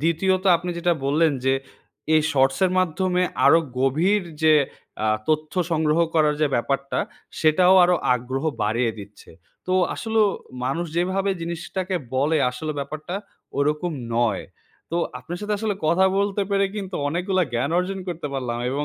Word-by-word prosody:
দ্বিতীয়ত 185 Hz, +4 st, +1 dB
আপনি 175 Hz, +1 st, -5 dB
যেটা 175 Hz, +1 st, +2 dB
বললেন 155 Hz, +3 st, +3 dB
যে, 135 Hz, -, +3 dB, 0.6 s
এই 155 Hz, -, +5 dB
শর্টসের 135 Hz, +6 st, +3 dB
মাধ্যমে 180 Hz, +1 st, +1 dB, 0.2 s
আরো 165 Hz, -, +7 dB, 0.2 s
গভীর 165 Hz, +10 st, +2 dB, 0.2 s
যে 155 Hz, -1 st, +6 dB, 0.5 s
আ -, -, +2 dB, 0.2 s
তথ্য 155 Hz, 0 st, 0 dB, 0.2 s
সংগ্রহ 155 Hz, 0 st, +2 dB, 0.2 s
করার 150 Hz, -2 st, +3 dB
যে 155 Hz, -, +4 dB
ব্যাপারটা, 140 Hz, +3 st, -1 dB, 0.4 s
সেটাও 180 Hz, +4 st, +5 dB
আরো 180 Hz, -, +3 dB, 0.2 s
আগ্রহ 130 Hz, +3 st, -3 dB, 0.2 s
বাড়িয়ে 115 Hz, +2 st, +1 dB
দিচ্ছে। 100 Hz, +1 st, -12 dB, 0.4 s
তো 185 Hz, -, -1 dB, 0.2 s
আসলো 225 Hz, -1 st, 0 dB, 0.4 s
মানুষ 165 Hz, +7 st, -1 dB
যেভাবে 190 Hz, +3 st, +1 dB
জিনিসটাকে 175 Hz, +2 st, -3 dB, 0.2 s
বলে, 150 Hz, +4 st, +2 dB
আসলে 155 Hz, +5 st, -4 dB
ব্যাপারটা 150 Hz, +5 st, -5 dB, 0.4 s
ওইরকম 150 Hz, +4 st, 0 dB, 0.2 s
নয়। 115 Hz, -4 st, +1 dB, 0.5 s
তো 170 Hz, -, -1 dB, 0.2 s
আপনার 165 Hz, +8 st, -7 dB
সাথে 210 Hz, 0 st, -1 dB
আসলে 215 Hz, -2 st, -1 dB
কথা 170 Hz, +4 st, +4 dB
বলতে 200 Hz, 0 st, 0 dB
পেরে 200 Hz, 0 st, +3 dB
কিন্তু 195 Hz, -2 st, -5 dB
অনেকগুলা 185 Hz, +4 st, 0 dB
জ্ঞান 125 Hz, +5 st, 0 dB
অর্জন 190 Hz, +2 st, -2 dB
করতে 170 Hz, -3 st, -4 dB
পারলাম 125 Hz, -3 st, -3 dB
এবং 145 Hz, +2 st, -1 dB
160 Hz, 145 wpm, -23 LUFS, 140-185 Hz, 0.6 s, আরো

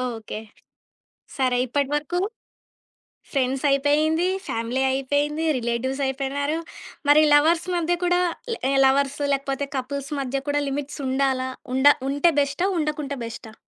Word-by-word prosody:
Okay. 220 Hz, -1 st, -7 dB, 1.0 s
సరే 255 Hz, -2 st, +2 dB
ఇప్పటి 280 Hz, +2 st, 0 dB
వరకు. 300 Hz, +4 st, -1 dB, 1.1 s
ఫ్రెండ్స్ 265 Hz, -1 st, 0 dB
అయిపోయింది, 305 Hz, +5 st, +2 dB, 0.2 s
ఫ్యామిలీ 230 Hz, +3 st, -2 dB
అయిపోయింది, 285 Hz, +4 st, 0 dB
రిలేటివ్స్ 245 Hz, +3 st, -2 dB
అయిపోయినారు. 280 Hz, +3 st, -2 dB, 0.5 s
మరి 295 Hz, +1 st, +7 dB
లవర్స్ 325 Hz, +4 st, +4 dB
మధ్య 345 Hz, 0 st, +1 dB
కూడా 355 Hz, 0 st, +3 dB, 0.3 s
ల -, -, -2 dB, 0.3 s
లవర్స్, 275 Hz, +1 st, +2 dB
లేకపోతే 275 Hz, 0 st, -2 dB
కపుల్స్ 275 Hz, +2 st, -4 dB
మధ్య 270 Hz, 0 st, -2 dB
కూడా 290 Hz, 0 st, +1 dB
లిమిట్స్ 285 Hz, +2 st, -4 dB
ఉండాలా? 260 Hz, -1 st, 0 dB, 0.3 s
ఉండ 265 Hz, +2 st, +4 dB, 0.2 s
ఉంటే 285 Hz, +5 st, +3 dB
బెస్టా? 280 Hz, +6 st, 0 dB
ఉండకుంటే 300 Hz, -2 st, -2 dB
బెస్టా? 230 Hz, -1 st, -9 dB
280 Hz, 120 wpm, -24 LUFS, 265-295 Hz, 1.1 s, మరి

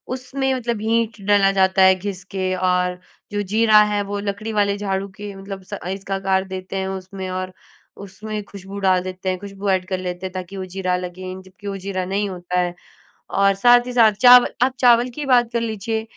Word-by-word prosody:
उसमें 265 Hz, +1 st, -2 dB
मतलब 235 Hz, -4 st, -2 dB
हींग 225 Hz, 0 st, 0 dB
डाला 195 Hz, -1 st, +5 dB
जाता 190 Hz, 0 st, +3 dB
है, 190 Hz, 0 st, +7 dB
घिस 185 Hz, 0 st, -6 dB
के 185 Hz, -1 st, 0 dB, 0.2 s
और 180 Hz, 0 st, 0 dB, 0.3 s
जो 205 Hz, -, -1 dB
जीरा 215 Hz, -1 st, +6 dB
है, 205 Hz, 0 st, +1 dB
वो 200 Hz, 0 st, -4 dB
लकड़ी 205 Hz, +2 st, -4 dB
वाले 205 Hz, -1 st, +1 dB
झाड़ू 195 Hz, -1 st, -2 dB
के 205 Hz, -1 st, -6 dB
मतलब 195 Hz, 0 st, -8 dB
स -, -, -12 dB
अ, 180 Hz, -, -5 dB
इसका 195 Hz, +1 st, -4 dB
आकार 190 Hz, 0 st, +1 dB
देते 185 Hz, +1 st, -7 dB
हैं 190 Hz, 0 st, -2 dB
उसमें 190 Hz, 0 st, -6 dB
और 185 Hz, 0 st, -7 dB, 0.5 s
उसमें 210 Hz, +2 st, -6 dB
खुशबू 200 Hz, 0 st, -10 dB
डाल 185 Hz, -1 st, +3 dB
देते 185 Hz, 0 st, -4 dB
हैं, 185 Hz, -, -1 dB
खुशबू 200 Hz, 0 st, -5 dB
ऐड 185 Hz, -1 st, +1 dB
कर 190 Hz, -, -2 dB
लेते 180 Hz, 0 st, -5 dB
हैं, 185 Hz, -, -4 dB
ताकि 185 Hz, +1 st, -6 dB
वो 190 Hz, -, -4 dB
जीरा 185 Hz, -1 st, 0 dB
लगे, 180 Hz, +1 st, -6 dB
जबकि 190 Hz, +2 st, -13 dB
वो 200 Hz, -, -3 dB
जीरा 185 Hz, -1 st, -3 dB
नहीं 200 Hz, +2 st, -1 dB
होता 180 Hz, 0 st, -3 dB
है। 175 Hz, -1 st, 0 dB, 0.6 s
और 195 Hz, 0 st, +4 dB
साथ 245 Hz, 0 st, +6 dB
ही 250 Hz, -, -4 dB
साथ, 225 Hz, -3 st, +6 dB
चाव 245 Hz, +4 st, +7 dB, 0.2 s
आप 255 Hz, 0 st, +1 dB
चावल 240 Hz, 0 st, +5 dB
की 295 Hz, +3 st, -5 dB
बात 245 Hz, -3 st, +4 dB
कर 235 Hz, -, 0 dB
लीजिए, 220 Hz, 0 st, -2 dB
195 Hz, 210 wpm, -21 LUFS, 185-215 Hz, 0.6 s, है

